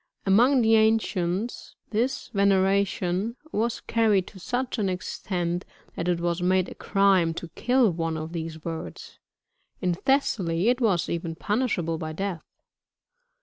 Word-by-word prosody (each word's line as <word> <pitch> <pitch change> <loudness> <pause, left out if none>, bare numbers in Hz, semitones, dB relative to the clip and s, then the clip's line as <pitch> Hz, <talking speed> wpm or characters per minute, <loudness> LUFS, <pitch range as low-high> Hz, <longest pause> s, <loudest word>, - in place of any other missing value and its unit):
Among 240 +6 +5
the 225 0 +5
ancients, 220 -2 0 0.2
this 235 +5 -1
veneration 195 +1 +1 0.2
was 230 0 -1
carried 215 -5 +2
to 190 - -14
such 245 +4 -2
an 200 -2 +1
extent, 180 -1 -3 0.3
that 170 - -3
it 175 -1 +1
was 170 0 -1
made 185 0 +2
a - - -8
crime 190 -5 +2
to 170 - -6
kill 245 +4 +2
one 165 -1 -2
of 160 +1 -6
these 165 -1 -4
birds; 160 - -7 0.6
in 180 -1 0
Thessaly 195 -5 +1
it 250 +1 +1
was 195 -8 +2
even 165 -1 -3
punishable 180 -5 -1
by 155 -1 -4
death. 190 -1 -4
190 Hz, 140 wpm, -26 LUFS, 170-220 Hz, 0.6 s, Among